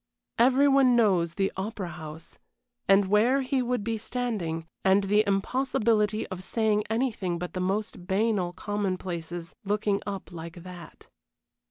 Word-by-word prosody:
Every 260 Hz, +4 st, +5 dB
one 270 Hz, -3 st, +5 dB
knows 185 Hz, -8 st, +3 dB
the 195 Hz, -1 st, 0 dB
Opera 190 Hz, -1 st, -4 dB
House, 160 Hz, -1 st, -9 dB, 0.5 s
and 195 Hz, 0 st, +5 dB
where 230 Hz, +8 st, +3 dB
he 260 Hz, 0 st, 0 dB
would 245 Hz, -3 st, -1 dB
be 225 Hz, 0 st, -2 dB
standing, 210 Hz, -9 st, -3 dB, 0.2 s
and 195 Hz, +1 st, +4 dB
the 210 Hz, +2 st, +3 dB
impossibility 215 Hz, 0 st, +1 dB
of 185 Hz, -2 st, -6 dB
saying 215 Hz, 0 st, +1 dB
anything 220 Hz, -7 st, -1 dB
but 180 Hz, +1 st, -5 dB
the 185 Hz, -, -3 dB
most 190 Hz, -1 st, -2 dB
banal 195 Hz, -2 st, +1 dB
commonplaces, 180 Hz, -4 st, -4 dB
looking 205 Hz, 0 st, 0 dB
up 195 Hz, -2 st, -5 dB
like 170 Hz, 0 st, -8 dB
that. 180 Hz, -3 st, -11 dB
200 Hz, 140 wpm, -27 LUFS, 180-225 Hz, 0.5 s, Every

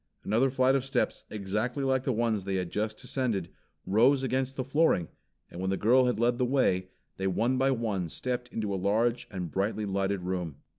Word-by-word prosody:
Another 115 Hz, +6 st, +2 dB
flight 130 Hz, 0 st, +3 dB
of 135 Hz, -2 st, +1 dB
steps 135 Hz, -2 st, -1 dB
exactly 105 Hz, +6 st, -2 dB
like 130 Hz, -1 st, +1 dB
the 130 Hz, -, +1 dB
ones 115 Hz, -3 st, 0 dB
they 95 Hz, 0 st, -2 dB
had 90 Hz, -2 st, -2 dB
just 110 Hz, +1 st, -2 dB
descended 115 Hz, -10 st, -2 dB, 0.4 s
rose 125 Hz, +7 st, +4 dB
against 130 Hz, +1 st, -1 dB
the 130 Hz, -, -2 dB
flooring; 135 Hz, -, +2 dB, 0.4 s
and 85 Hz, -, -7 dB
when 95 Hz, -, -1 dB
the 95 Hz, -, 0 dB
girl 125 Hz, +4 st, +4 dB
had 125 Hz, -3 st, 0 dB
led 120 Hz, +1 st, +2 dB
the -, -, +2 dB
way, 120 Hz, -8 st, +1 dB, 0.3 s
they 95 Hz, -, -1 dB
one 120 Hz, +7 st, +1 dB
by 135 Hz, +1 st, +3 dB
one 110 Hz, -9 st, -1 dB
stepped 125 Hz, +6 st, -3 dB
into 105 Hz, -4 st, -3 dB
a -, -, -1 dB
large 115 Hz, +4 st, +1 dB
and 90 Hz, -5 st, -5 dB
brightly 105 Hz, +2 st, -1 dB
lighted 100 Hz, -1 st, -1 dB
room. 90 Hz, -5 st, -3 dB
115 Hz, 200 wpm, -29 LUFS, 95-130 Hz, 0.4 s, rose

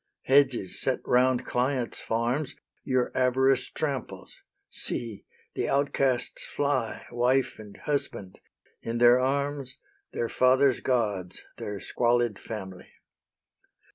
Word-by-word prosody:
Hedges 130 Hz, -8 st, +2 dB
set -, -, 0 dB
round 125 Hz, 0 st, +3 dB
clients' 125 Hz, -1 st, -1 dB
farms 120 Hz, +6 st, -1 dB, 0.3 s
Your 130 Hz, -2 st, 0 dB
avarice 130 Hz, +1 st, +2 dB
tramples; 140 Hz, -5 st, -4 dB, 0.3 s
see, 110 Hz, -4 st, -4 dB, 0.3 s
the -, -, -2 dB
outcasts 135 Hz, -2 st, +1 dB
fly, 140 Hz, -5 st, -1 dB
Wife 125 Hz, +2 st, +1 dB
and 105 Hz, -2 st, -11 dB
husband, 140 Hz, -10 st, -3 dB, 0.4 s
in 115 Hz, +1 st, -3 dB
their 120 Hz, +1 st, +6 dB
arms 140 Hz, 0 st, -1 dB, 0.3 s
Their 115 Hz, -, -2 dB
fathers' 130 Hz, +1 st, +3 dB
gods, 105 Hz, -8 st, -1 dB
their 105 Hz, -1 st, -5 dB
squalid 120 Hz, -2 st, +1 dB
family. 95 Hz, -5 st, -7 dB
125 Hz, 105 wpm, -27 LUFS, 115-135 Hz, 0.4 s, their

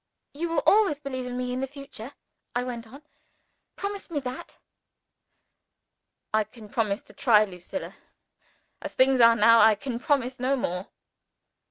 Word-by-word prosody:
"You 330 Hz, +4 st, -3 dB
will 330 Hz, -, 0 dB
always 395 Hz, -9 st, +4 dB
believe 260 Hz, -3 st, -5 dB
in 250 Hz, 0 st, -5 dB
me 250 Hz, 0 st, -2 dB
in 255 Hz, -, -2 dB
the 270 Hz, -, -2 dB
future?" 275 Hz, -2 st, -10 dB, 0.4 s
I 245 Hz, -, +1 dB
went 235 Hz, -2 st, -6 dB
on. 275 Hz, +6 st, -14 dB, 0.7 s
"Promise 400 Hz, -1 st, -5 dB
me 310 Hz, -4 st, -2 dB
that." 255 Hz, 0 st, -7 dB, 1.8 s
"I 215 Hz, 0 st, +3 dB
can 215 Hz, 0 st, -14 dB
promise 215 Hz, +2 st, -1 dB
to -, -, -17 dB
try, 215 Hz, -4 st, +4 dB
Lucilla. 185 Hz, +8 st, -7 dB, 0.9 s
As -, -, -7 dB
things 260 Hz, 0 st, +4 dB
are 230 Hz, -1 st, +7 dB
now 230 Hz, +1 st, +6 dB
I 220 Hz, -1 st, +6 dB
can 235 Hz, +2 st, -5 dB
promise 260 Hz, -2 st, 0 dB
no 260 Hz, +2 st, +1 dB
more." 180 Hz, -4 st, -3 dB
250 Hz, 155 wpm, -26 LUFS, 225-275 Hz, 1.8 s, are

